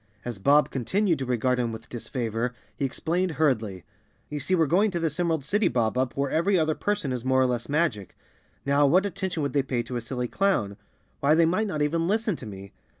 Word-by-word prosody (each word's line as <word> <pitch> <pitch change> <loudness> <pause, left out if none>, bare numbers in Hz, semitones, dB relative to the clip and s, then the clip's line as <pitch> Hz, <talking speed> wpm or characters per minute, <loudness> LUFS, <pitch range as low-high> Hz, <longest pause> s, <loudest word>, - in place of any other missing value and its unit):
As 120 -5 -5
Bob 145 +8 +4
continued 175 - 0
to 130 - -3
regard 125 +1 +1
him 120 -2 0
with 110 +1 -9
disfavor, 120 0 -3 0.2
he 140 - -1
explained 170 +6 -1
hurriedly, 110 - 0 0.5
"You 150 - -4
see 165 +7 +1
we're 165 -2 +3
go¬ 180 +7 +3
ing 215 - +3
to 175 -3 -2
this 165 0 -2
Emerald 165 -5 0
City, 205 +7 +2
Bob 115 -2 0
Up, 130 0 -1
where 140 -1 0
every 185 +4 +2
other 155 -1 +2
person 205 -7 -2
is 125 -2 -4
more 130 0 +2
or 130 - +4
less 125 0 -2
magic. 140 - -1 0.5
Now, 140 +1 +4
what 185 +7 +4
attention 190 -4 -3
would 140 -2 -2
they 140 - +3
pay 130 -3 -2
to 120 +1 -5
a - - -3
silly 125 +1 -3
clown? 120 - 0 0.4
Why, 145 +3 +4
they 165 0 +5
might 185 +7 +1
not 155 -6 -1
even 165 +3 0
listen 215 0 +1
to 120 - -9
me. 100 -1 -10
140 Hz, 225 wpm, -26 LUFS, 125-170 Hz, 0.5 s, they